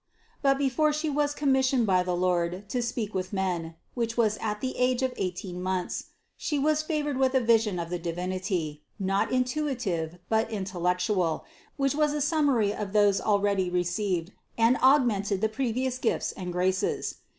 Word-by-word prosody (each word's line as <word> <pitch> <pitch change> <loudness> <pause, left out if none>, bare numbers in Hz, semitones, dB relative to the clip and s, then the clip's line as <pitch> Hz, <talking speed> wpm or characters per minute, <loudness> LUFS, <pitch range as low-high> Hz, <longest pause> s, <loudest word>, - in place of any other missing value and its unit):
But 275 -1 +3
before 280 +2 +2
She 305 0 -1
was 290 0 0
commissioned 265 -4 +2
by 185 -3 +3
the 180 0 -1
Lord 180 +1 0
to 250 - -1
speak 230 -3 -3
with 185 -1 -3
men 180 -4 -2 0.2
(which 235 -1 -2
was 220 -3 +2
at 210 -1 -2
the 260 +2 -3
age 250 0 +2
of 260 -1 0
eighteen 180 0 -4
months), 185 -1 -2 0.3
She 300 - -2
was 305 +2 +2
favored 300 -3 -2
with 265 0 +2
a - - +6
vision 225 -5 +3
of 170 0 -4
the 175 - -2
Divinity, 175 -2 -3 0.2
not 195 -1 0
intuitive 250 - -1
but 220 0 +1
intellectual, 180 -3 -1 0.3
which 275 -2 +1
was 300 0 +2
a 295 - -1
summary 280 -9 +2
of 205 -2 -5
those 205 -2 +4
already 200 -3 +1
received 180 0 -1 0.3
and 230 +2 +4
augmented 230 -8 +3
the 220 +2 +1
previous 255 +2 -1
gifts 230 - 0
and 180 -2 -6
graces. 185 +1 0
210 Hz, 165 wpm, -27 LUFS, 185-260 Hz, 0.3 s, a